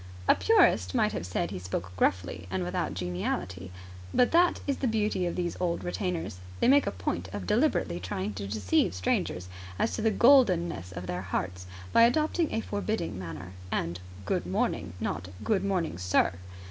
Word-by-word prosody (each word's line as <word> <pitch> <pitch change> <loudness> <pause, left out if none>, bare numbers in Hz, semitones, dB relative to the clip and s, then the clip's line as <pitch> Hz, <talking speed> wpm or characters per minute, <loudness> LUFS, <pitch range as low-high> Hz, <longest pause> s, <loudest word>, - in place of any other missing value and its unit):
A - - +8
purist 450 -10 +3
might 215 -3 +3
have - - -4
said 90 -1 -2
he 95 - -4
spoke 90 0 -5
gruffly 90 -1 0
and 95 0 -1
without 90 -2 -2
geniality. 90 +1 -3 0.4
But 245 - +3
that 345 +1 +4
is 280 -2 0
the 265 - 0
beauty 210 -5 0
of 175 - -3
these 175 -1 -2
old 175 -1 -1
retainers. 175 - -3 0.2
They - - +3
make 280 +2 +5
a - - +1
point 90 0 -3
of 100 -2 -5
deliberately 85 0 +1
trying 95 +3 -3
to 100 0 -5
deceive 100 -3 +1
strangers 90 0 -1 0.3
as - - 0
to - - -2
the 225 - +3
goldenness 190 - +4
of 90 0 -6
their 90 0 -3
hearts 90 0 -3 0.3
by - - +6
adopting 310 +7 +3
a 225 - 0
forbidding 205 - -3
manner. 90 0 -7 0.2
And 85 +2 -1 0.3
"Good - - -1
morning!" 90 +1 -1
Not 85 +3 -3 0.2
"Good 200 -3 +1
morning, 180 - -1
sir!" 90 -1 +2
95 Hz, 175 wpm, -29 LUFS, -, 0.4 s, A